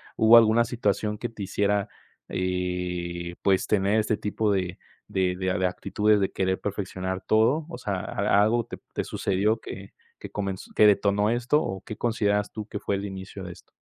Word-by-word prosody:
hubo 110 +1 +7
alguna 115 +1 +5
situación 105 -2 -1
que 120 - -3
te 105 -3 -7
hiciera, 100 +1 0 0.4
eh, 90 -1 -3
pues, 95 -1 +2
tener 105 +1 +2
este 105 -1 0
tipo 105 0 -1
de 95 -2 -1 0.3
de 90 -1 0
de 95 0 -1
a - - 0
de 95 - +3
actitudes, 105 +3 +1
de 95 - 0
querer 95 0 0
perfeccionar 95 -2 -4
todo, 125 +9 +3
o - - -6
sea, 100 - -3
¿a 100 +1 +1
algo 115 +2 +2
te - - -8 0.2
te - - -1
sucedió 100 +4 0
que 95 -2 -9 0.3
que - - -9
comenz 95 -2 -4
que 105 - +6
detonó 105 +1 +3
esto, 125 +6 +2
o 95 0 -3
qué 110 - -7
consideras 105 -3 0
tú 110 -1 -6
que 105 - -5
fue 100 - -1
el 100 +1 -3
inicio 95 0 -7
de 90 - -7
esto? - - -19
100 Hz, 190 wpm, -26 LUFS, 95-110 Hz, 0.4 s, hubo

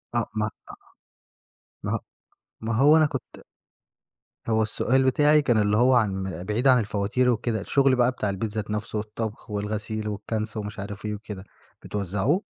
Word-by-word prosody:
آه، 120 -2 0
ما 110 0 0 0.2
أ - - -10 1.1
ما - - -2
هو - - 0 0.6
ما 115 +1 -2
هو 145 +7 +6
أنا 155 - +5
كنت 135 -3 -6 1.1
هو 110 0 +3
السؤال 130 +5 +2
بتاعي 150 +3 +4
كان 120 -5 +2
اللي 105 0 +3
هو 125 +3 +5
عن 95 -6 0
بعيد 105 +7 0
عن 130 -1 +6
الفواتير 105 +4 +1
وكده، 115 -2 0
الشُغل 135 +4 +3
بقى 125 0 +3
بتاع 105 -5 -2
البيت 100 +2 -3
ذات 105 0 -4
نفَسْه 105 +1 -3
والطَبْخ 110 +1 -5
والغسيل 105 +1 -3
والكَنْس 110 +1 -3
ومش 105 -1 -5
عارف 100 +1 -6
إيه 105 - -2
وكده، 105 -3 -8 0.4
بتوزَّعوه؟ 105 - -1
110 Hz, 160 wpm, -25 LUFS, 105-125 Hz, 1.1 s, هو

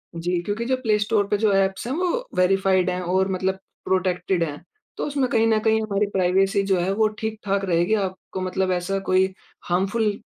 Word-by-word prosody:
जी 175 +1 -1
क्योंकि 210 +5 -3
जो 260 - +1
प्लेस्टोर 210 -2 +1
पे 205 - +1
जो 210 -1 +2
ऐप्स 195 +3 +1
हैं, 255 - -2
वो 370 +8 -1
वेरिफाइड 185 0 +3
हैं 180 0 -3
और 185 +2 +1
मतलब 190 +1 -1 0.3
प्रोटेक्टेड 185 -1 0
हैं। 150 -3 -5 0.3
तो - - -2
उसमें 280 -3 0
कहीं 225 -1 +3
न 220 -1 +3
कहीं 220 0 +2
हमारी 210 -1 0
प्राइवेसी 195 +2 +2
जो 190 - +3
है 180 +2 0
वो 215 +2 +3
ठीक-ठाक 205 -3 -2
रहेगी, 175 +3 +1
आपको 190 -2 -3
मतलब 185 0 -1
ऐसा 180 +2 -1
कोई 185 0 +4 0.4
हार्मफुल 205 +4 +1
195 Hz, 185 wpm, -23 LUFS, 185-215 Hz, 0.4 s, कोई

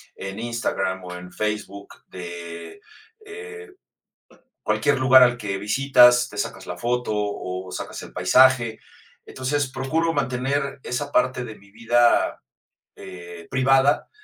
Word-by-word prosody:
en 95 +2 -7
Instagram 115 -5 -2
o 90 0 -7
en 90 0 -10
Facebook 105 -2 -4
de, 85 - -9 0.4
eh, 445 0 -10 0.9
cualquier 145 -2 +1
lugar 130 0 +7
al 120 -1 +4
que 100 -3 -3
visitas, 125 +2 +4
te - - -12
sacas - - -4
la 90 - -6
foto 120 +4 -2
o 95 -3 -4
sacas - - -6
el - - -11
paisaje. 115 +5 +3 0.4
Entonces, 135 +2 -2
procuro 135 +6 -1
mantener 135 0 -2
esa 140 +4 -4
parte 130 -1 +1
de 110 -3 -9
mi 100 0 -21
vida, 120 +3 +2 0.5
eh, 85 -2 -11
privada, 135 +2 +2
120 Hz, 125 wpm, -23 LUFS, 95-135 Hz, 0.9 s, lugar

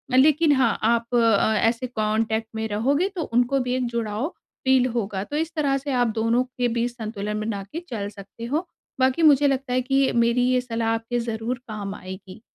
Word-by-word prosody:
लेकिन 300 +4 +5
हाँ, 260 -3 +2
आप 235 +1 +1
अ, 225 -2 +4
ऐसे 240 +2 -1
कॉन्टेक्ट 220 -1 -1
में 220 0 -2
रहोगे, 270 - +1
तो 345 - -2
उनको 245 +3 +3
भी 250 0 -1
एक 255 -1 0
जुड़ाव 230 +1 -2 0.4
फ़ील 260 -1 +4
होगा। 200 -3 -2
तो 290 - -6
इस 325 +1 -1
तरह 280 -3 +1
से 280 +1 -4
आप 245 -2 +2
दोनों 230 +2 +2
के 250 -1 -2
बीच 235 +1 -1
संतुलन 215 -3 -4
बना 210 -2 -3
के 330 - -4
चल 205 -4 -3
सकते 205 +3 -10
हो। 310 +8 -2 0.3
बाकी 260 +5 +2
मुझे 290 -2 +6
लगता 270 -2 -1
है, 255 - +2
कि 270 +2 -2
ये 275 -1 +3
मेरी 235 +1 +3
ये 250 0 +2
सलाह 230 -2 -2
आपके 225 +2 -2
ज़रूर 230 +1 -3
काम 205 -2 -5
आएगी। 190 +1 -10
235 Hz, 200 wpm, -24 LUFS, 220-260 Hz, 0.4 s, मुझे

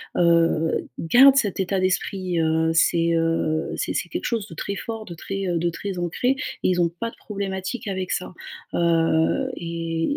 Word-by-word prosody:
heu, 165 -2 +2
gardent 265 +10 +6
cet 205 -8 +1
état 190 0 0
d'esprit 185 -1 -1
heu, 160 0 +2
c'est 170 0 +3
heu, 165 -1 +1
c'est - - -2
c'est 175 - -2
quelque - - -4
chose 230 -4 -1
de - - -11
très 200 +5 -4
fort, 225 +1 -6
de 170 - -8
très, 195 +3 -4
heu, 175 -1 0
de 170 +1 0
très 195 +2 -5
ancré 175 +9 0
et 270 - -1 0.3
ils 180 -1 +1
ont 170 - +3
pas 230 - -2
de - - -15
problématique 195 +2 -4
avec 190 -2 -3
ça. 180 - -2 0.4
Heu, 165 +9 +2
et 165 -1 -3
175 Hz, 185 wpm, -23 LUFS, 165-200 Hz, 0.4 s, gardent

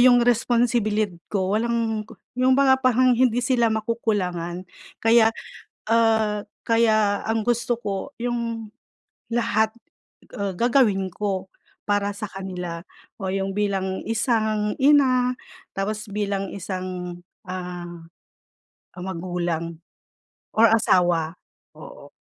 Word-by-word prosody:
yung 245 -1 +6
responsibilid 230 -4 +1
ko 190 -2 -1
walang, 230 -1 0 0.3
yung 255 +1 +4
'baga 265 -1 +4
parang 255 0 +4
hindi 245 -1 +3
sila 240 -2 +3
makukulangan. 195 -6 -2 0.4
Kaya, 225 0 +5 0.6
ah, 220 -2 +2 0.2
kaya 215 -3 +3
ang 225 -1 0
gusto 240 +1 +1
ko 205 +5 -4
yung, 230 -2 -3 0.6
lahat, 220 -2 +1 0.6
ah, 200 -1 -2
gagawin 225 -4 +3
ko 195 0 -3 0.4
para 205 0 +1
sa 205 +1 -5
kanila 180 -3 -6 0.3
o 190 -4 -4
yung 195 0 -2
bilang 195 -2 -1
isang 220 -2 0
ina, 260 -3 +4 0.4
tapos 210 +2 -4
bilang 200 -1 -2
isang, 185 -2 -5 0.3
ah, 175 -2 -6 0.9
ah, 180 - -7
magulang 175 -2 -3 0.8
or 230 +1 +6
asawa. 175 -7 +3 0.4
Oo. - - -12
215 Hz, 105 wpm, -24 LUFS, 190-235 Hz, 0.9 s, yung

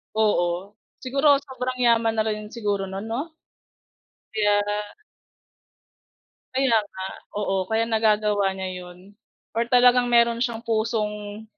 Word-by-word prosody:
Oo. 195 -2 0 0.2
Siguro 275 +3 +4
sobrang 255 -2 -4
yaman 230 -1 +3
na 220 - +2
rin 215 -1 -3
siguro 205 -4 -1
nun, 195 +2 -6
'no? 280 +9 -3 1.0
Kaya 205 -1 0 1.6
Kaya 260 -3 +3
nga. 190 -2 -9 0.4
Oo, 190 -2 0
kaya 220 +3 +1
nagagawa 210 -3 +2
niya 190 -1 -4
'yon 180 +3 -13 0.4
or 230 - +2
talagang 245 0 +5
meron 235 -1 +3
siyang 235 -2 -2
pusong 215 -2 -2
220 Hz, 115 wpm, -24 LUFS, 205-235 Hz, 1.6 s, talagang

